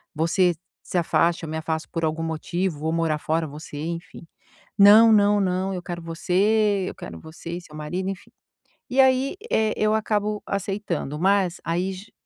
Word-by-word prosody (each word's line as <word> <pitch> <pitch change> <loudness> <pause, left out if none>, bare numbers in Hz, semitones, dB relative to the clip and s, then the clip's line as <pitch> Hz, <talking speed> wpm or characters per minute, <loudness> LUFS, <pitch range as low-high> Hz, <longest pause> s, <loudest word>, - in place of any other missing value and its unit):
você 175 +2 +2 0.3
se - - -3
afasta, 170 0 +1
eu 155 - -7
me 160 - -4
afasto 160 0 -3
por 165 -1 -4
algum 160 +1 -1
motivo, 165 +1 -2
vou 160 +2 -1
morar 165 -2 0
fora, 160 +2 -1
você, 150 0 -9
enfim", 170 0 -7 0.5
"Não, 210 +3 +8
não, 205 -1 +4
não, 190 +1 0
eu 180 - -4
quero 175 -2 -6
você, 195 +5 +1
eu - - -9
quero - - -9
você 160 +1 -9
e 180 - -8
seu 150 -3 -14
marido", 180 +6 -3
enfim. 195 0 -8 0.6
E 265 - +3
aí, 265 +3 +3 0.2
eh, 220 -1 +2
eu 215 0 +2
acabo 210 -1 0
aceitando, 195 -7 -3
mas 190 -1 +2
aí 180 +3 -1
j 190 +3 -12
180 Hz, 175 wpm, -24 LUFS, 165-205 Hz, 0.6 s, Não